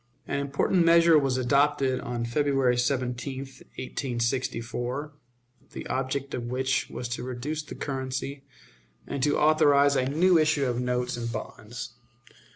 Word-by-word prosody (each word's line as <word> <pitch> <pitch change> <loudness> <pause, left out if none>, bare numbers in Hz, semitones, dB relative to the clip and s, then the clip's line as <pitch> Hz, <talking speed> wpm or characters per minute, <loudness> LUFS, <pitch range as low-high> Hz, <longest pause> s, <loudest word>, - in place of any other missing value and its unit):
An - - -1
important 140 +6 +1
measure 170 -1 +6
was 135 -2 0
adopted 140 +1 +2
on 120 -1 -3
February 135 0 +2
17, 125 +1 -1
1864, 125 0 -3 0.6
the - - -6
object 135 +1 -2
of 120 - -3
which 130 +2 0
was 120 - -5
to 120 - -3
reduce 130 +5 -4
the 150 - -9
currency 135 0 -4 0.6
and 140 - -4
to 145 +3 +2
authorize 145 -2 +4
a 130 -1 +1
new 170 +4 +4
issue 155 -2 +2
of 120 -1 -1
notes 125 0 -1
and 115 -1 -3
bonds. 115 +2 -7
135 Hz, 135 wpm, -27 LUFS, 125-145 Hz, 0.6 s, measure